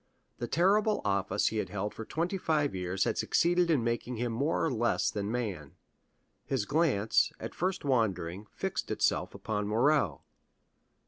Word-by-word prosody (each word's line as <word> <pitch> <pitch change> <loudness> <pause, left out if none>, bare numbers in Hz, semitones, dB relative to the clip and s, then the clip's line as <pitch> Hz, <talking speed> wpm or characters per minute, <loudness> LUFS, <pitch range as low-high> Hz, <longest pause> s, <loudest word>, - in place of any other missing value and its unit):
The 120 - -3
terrible 205 - +3
office 100 -1 +1
he 110 - -4
had 95 -4 -2
held 105 +2 -3
for 115 - -7
twenty 175 - -2
five 150 -4 +1
years 95 +1 -1
had - - -1
succeeded 175 0 +2
in 145 -8 +3
making 120 +1 -2
him 120 +1 -1
more 145 +8 0
or 160 - 0
less 120 0 +1
than 100 0 -3
man. 100 -12 -4 0.7
His 130 -6 -1
glance, 120 -7 +2
at - - -6
first 185 -2 -2
wandering, 100 -7 0
fixed - - -3
itself - - 0
upon 105 -2 -2
Morrel. 115 - +2
120 Hz, 155 wpm, -30 LUFS, 105-155 Hz, 0.7 s, terrible